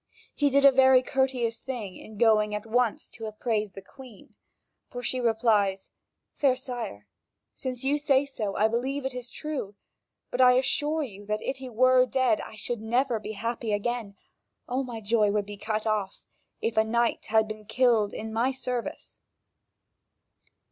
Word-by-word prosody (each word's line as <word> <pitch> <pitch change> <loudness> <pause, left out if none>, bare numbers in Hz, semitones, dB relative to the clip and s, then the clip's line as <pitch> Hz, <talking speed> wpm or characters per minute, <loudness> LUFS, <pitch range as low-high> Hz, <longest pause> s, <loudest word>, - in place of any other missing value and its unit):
He 290 -1 +2
did 280 +1 +4
a 275 - +9
very 260 -1 +6
courteous 255 -4 0
thing 225 -8 -6
in 215 -1 -12
going 215 -2 +3
at 210 - -5
once 235 0 0
to 225 -1 -8
appraise 215 0 -2
the 195 - -10
Queen. 250 -1 -15 0.6
And 245 0 -6
she 255 - 0
replies: 220 -5 +1 0.4
"Fair 270 -3 +2
sire, 240 - -6 0.5
since 255 -1 -5
you 285 +2 +1
say 280 -2 +3
so, 215 -8 -4
I 215 - +3
believe 260 +5 -2
it 265 - -2
is 250 -1 -6
true, 275 -9 -5 0.6
but 250 - +1
I 250 0 +7
assure 295 +5 +1
you 205 -5 -9
that, 210 0 -2
if 265 - -2
he 260 -1 -8
were 255 +2 +4
dead, 255 -5 +2
I - - -9
should 230 +1 -4
never 240 +1 +1
be 215 +1 -6
happy 230 +1 -3
again. 210 -1 -2 0.5
All 255 +2 -1
my 240 -3 -6
joy 215 0 +2
would 205 0 0
be 205 0 -8
cut 215 +1 -3
off, 210 -3 -2 0.4
if 225 - -2
a 220 - +6
knight 235 +1 0
had 220 0 +3
been 215 0 -8
killed 225 -2 +2
in 220 0 -6
my 240 +4 +1
service." 250 -2 -5
235 Hz, 170 wpm, -27 LUFS, 215-255 Hz, 0.6 s, a